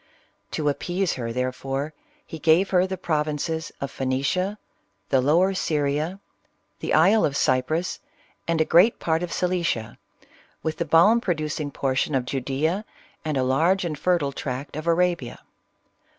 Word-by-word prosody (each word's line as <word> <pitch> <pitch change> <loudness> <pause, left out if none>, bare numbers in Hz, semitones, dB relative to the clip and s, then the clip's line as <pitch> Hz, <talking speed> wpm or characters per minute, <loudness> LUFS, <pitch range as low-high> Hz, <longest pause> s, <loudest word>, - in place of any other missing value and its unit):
To 150 - -1
ap 145 - 0
pease 180 +1 -1
her, 115 -3 -4
therefore, 135 +4 -3 0.3
he 160 - -8
gave 165 +5 +3
her 185 0 +3
the 190 0 -4
provinces 155 -1 -2
of 140 -1 -5
PI 135 - -3
ice - - -1
nicia, 180 +10 0 0.5
the 130 - +3
Lower 170 +8 +3
Syria, 155 +1 -1 0.6
the - - -4
isle 195 +8 +5
of 140 -1 +1
Cyprus, 155 +8 0 0.5
and 165 -1 +1
a 160 - +3
great 180 +9 +5
part 160 0 0
of 175 -1 -4
Cilicia, 170 -11 -1 0.6
with 160 0 -2
the 170 - -1
balm 175 +9 +5
producing 155 -6 -2
portion 135 +1 -1
of 130 -2 0
Ju 135 +2 -2
dea, 155 +9 -1 0.4
and 155 -3 -1
a 130 - +2
large 165 +9 +2
and 160 -3 -2
fertile 160 -2 +1
tract 135 +1 -5
of 155 +2 -5
Arabia. 170 -6 +1
155 Hz, 160 wpm, -24 LUFS, 140-175 Hz, 0.6 s, isle